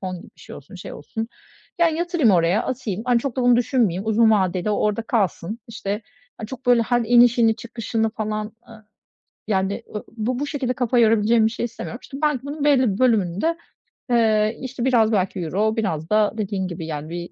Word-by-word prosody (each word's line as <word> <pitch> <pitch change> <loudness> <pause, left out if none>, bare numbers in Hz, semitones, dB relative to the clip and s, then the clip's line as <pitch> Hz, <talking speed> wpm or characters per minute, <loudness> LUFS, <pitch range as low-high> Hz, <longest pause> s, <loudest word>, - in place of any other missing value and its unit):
fon 185 -1 -4
gibi - - -15
bir - - -19
şey - - -10
olsun, 145 +6 -13
şey 180 - -9
olsun, 225 +10 -6 0.5
ya, 340 - +6
yatırayım 330 - +1
oraya, 175 +3 +3
atayım. 225 -6 -4
Hani, 245 -1 +3
çok 270 -2 -4
da 255 - 0
onu 245 -1 +5
düşünmeyeyim. 225 -6 +1
Uzun 220 +1 +4
vadede 190 -1 +1
o 205 - 0
orada 210 +2 0
kalsın. 210 -2 -1
İşte, 210 -1 -4 0.4
hani, 215 - -6
çok, 260 0 -9
böyle, 245 -2 +5
her 240 +1 +1
inişini 240 -1 +5
çıkışını 230 -1 -2
falan, 215 -1 -4 0.2
ııı, 220 -2 -14 0.6
yani, 200 +2 -1
ııı, 210 - -4
bu 245 +3 -1
bu 290 - -2
şekilde 265 -4 -2
kafa 245 0 +1
yorabileceğim 225 0 +4
bir 220 - +1
şey 235 - -3
istemiyorum. 235 +1 -7
İşte, 275 - -9
belki 295 -4 +1
bunun 290 +1 -5
belli 260 -8 +3
bir 195 - -6
bölümünü 205 -8 +2
de, 335 +1 0 0.5
eee, 220 -2 +2
işte, 260 -1 -4
biraz 230 -4 +3
belki 190 -1 0
euro, 205 +7 0
biraz 165 -7 -2
da 215 -1 +3
dediğin 195 -3 -2
gibi 165 -2 -6
yani 155 -1 -5
bir 175 +1 -6
220 Hz, 200 wpm, -22 LUFS, 200-245 Hz, 0.6 s, ya